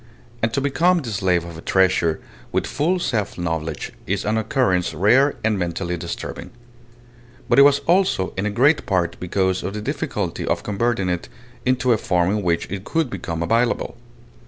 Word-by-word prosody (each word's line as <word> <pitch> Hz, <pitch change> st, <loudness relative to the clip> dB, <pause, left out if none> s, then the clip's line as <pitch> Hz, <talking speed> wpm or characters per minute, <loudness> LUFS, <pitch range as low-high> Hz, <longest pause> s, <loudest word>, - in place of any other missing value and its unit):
And 115 Hz, -, +1 dB
to -, -, +1 dB
become 170 Hz, +6 st, +3 dB
the 115 Hz, -, -5 dB
slave 95 Hz, -4 st, +1 dB
of 85 Hz, -1 st, -9 dB
a -, -, -9 dB
treasure 90 Hz, -4 st, +2 dB, 0.3 s
with -, -, 0 dB
full 165 Hz, +6 st, 0 dB
self 110 Hz, -, -2 dB
knowledge 80 Hz, -3 st, -3 dB, 0.2 s
is 100 Hz, +2 st, -1 dB
an 105 Hz, +1 st, +1 dB
occurrence 110 Hz, -5 st, +1 dB
rare 130 Hz, +9 st, +4 dB
and 110 Hz, -2 st, +1 dB
mentally 90 Hz, 0 st, -2 dB
disturbing. 85 Hz, 0 st, -6 dB, 1.0 s
But 120 Hz, +1 st, +4 dB
it -, -, +10 dB
was 140 Hz, 0 st, +6 dB
also 175 Hz, -, +2 dB
in 95 Hz, +3 st, -1 dB
a -, -, 0 dB
great 135 Hz, +9 st, +3 dB
part 90 Hz, -3 st, 0 dB
because 95 Hz, +1 st, 0 dB
of 95 Hz, +3 st, -4 dB
the -, -, -3 dB
difficulty -, -, -3 dB
of -, -, -1 dB
converting 105 Hz, -1 st, 0 dB
it 90 Hz, -1 st, -2 dB, 0.4 s
into 130 Hz, -1 st, +3 dB
a 110 Hz, -, 0 dB
form 90 Hz, 0 st, +1 dB
in 105 Hz, 0 st, 0 dB
which 85 Hz, -3 st, 0 dB
it 95 Hz, -1 st, -4 dB
could 160 Hz, -2 st, -1 dB
become 85 Hz, -3 st, -3 dB
available. 115 Hz, +6 st, +1 dB
100 Hz, 180 wpm, -22 LUFS, 90-125 Hz, 1.0 s, it